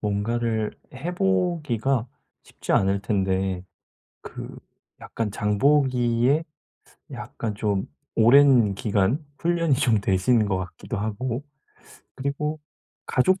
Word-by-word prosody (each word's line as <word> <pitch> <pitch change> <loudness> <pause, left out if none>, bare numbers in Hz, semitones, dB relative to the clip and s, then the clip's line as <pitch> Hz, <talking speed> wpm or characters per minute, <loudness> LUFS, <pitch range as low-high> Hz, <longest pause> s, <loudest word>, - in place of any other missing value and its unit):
뭔가를 110 +1 -1 0.2
해 165 +8 -4
보기가 160 - 0 0.4
쉽지 - - -5
않을 95 +1 +2
텐데 95 -2 -1 0.6
그 - - -8 0.5
약간 115 -2 -3
장보기에 125 +5 +2 0.7
약간 110 -3 -5
좀 100 -2 -1 0.3
오랜 120 -3 +6
기간 110 +7 0
훈련이 170 -4 +2
좀 120 -6 +2
되신 100 +4 +2
것 95 -2 0
같기도 95 +5 -6
하고 115 +5 -3 0.7
그리고 145 +3 -3 0.5
가족 185 +9 +2
120 Hz, 195 characters per minute, -24 LUFS, 105-140 Hz, 0.7 s, 오랜